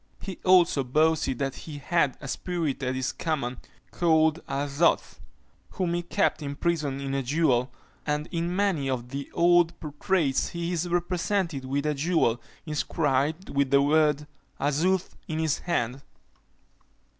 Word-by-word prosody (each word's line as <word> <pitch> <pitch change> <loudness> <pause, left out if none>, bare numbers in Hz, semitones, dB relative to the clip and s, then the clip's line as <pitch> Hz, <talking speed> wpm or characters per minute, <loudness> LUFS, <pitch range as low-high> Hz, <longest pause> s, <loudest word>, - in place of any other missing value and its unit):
He 190 -3 -7
also 180 -6 +5
boasted 155 0 +2
that 135 0 -1
he 150 -3 -8
had 145 -2 +1
a - - -8
spirit 165 -2 -2
at 130 -1 -1
his 130 0 -1
command, 135 -7 -2 0.3
called 160 -1 +2
"Azoth," 140 +4 +1 0.5
whom 180 -3 -1
he 175 - 0
kept 175 0 0
imprisoned 145 -1 -1
in 135 0 -3
a 135 - 0
jewel; 130 -2 +1 0.3
and 150 0 -1
in 170 +1 -1
many 185 -9 +1
of 125 -2 -3
the 140 +1 -5
old 175 0 +4
portraits 150 -1 0
he 170 +1 -3
is 175 +1 -1
represented 175 -3 -1
with 140 +2 -1
a 150 - +1
jewel, 145 -6 +1 0.2
inscribed 150 +1 0
with 140 -1 +1
the 140 0 +5
word 150 0 +3 0.3
"Azoth, 170 +6 +1
in 155 - -3
his 160 -2 0
hand." 135 -7 -2
150 Hz, 145 wpm, -27 LUFS, 140-170 Hz, 0.5 s, also